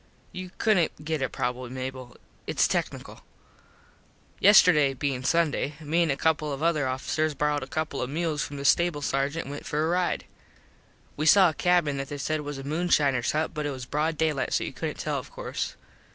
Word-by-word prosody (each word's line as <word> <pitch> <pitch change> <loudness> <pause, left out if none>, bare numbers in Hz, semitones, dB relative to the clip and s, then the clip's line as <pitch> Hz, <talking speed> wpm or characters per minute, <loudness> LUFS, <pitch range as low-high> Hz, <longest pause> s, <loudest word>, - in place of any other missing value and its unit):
You 185 -1 -7
couldnt 175 -8 +1
get 155 -2 -1
it 130 - -1
probably 125 0 -3
Mable. 130 -1 -6 0.3
Its - - +2
tecknickle. - - -3 1.2
Yesterday 170 -9 +6
being 130 -1 -2
Sunday 150 0 +1
me 160 +2 0
an 165 - +2
a 135 - 0
couple 155 -1 +1
of 140 +2 -4
other 155 -5 +2
officers 150 +4 -1
borrowed 150 0 0
a 130 - -6
couple 155 -1 -3
of 125 - -2
mules 155 0 -1
from 145 - -4
the 140 - -5
stable 170 -2 +3
Sargent 140 +4 -1
an 140 - -7
went 145 - -7
for 150 +1 0
a - - 0
ride. 180 +1 0 0.9
We 155 +2 -1
saw 190 0 +7
a - - -4
cabin 175 -5 +2
that 135 0 -4
they 145 - -5
said 155 +2 -1
was 145 -1 -6
a 135 - -7
moonshiners 145 -4 +1
hut 155 +1 -1
but 150 -2 -2
it - - -2
was 130 -2 -6
broad 155 +4 -1
daylight 155 -4 0
so - - +1
you - - -5
couldnt - - -4
tell - - -2
of - - -11
course. - - -5
150 Hz, 200 wpm, -27 LUFS, 135-160 Hz, 1.2 s, saw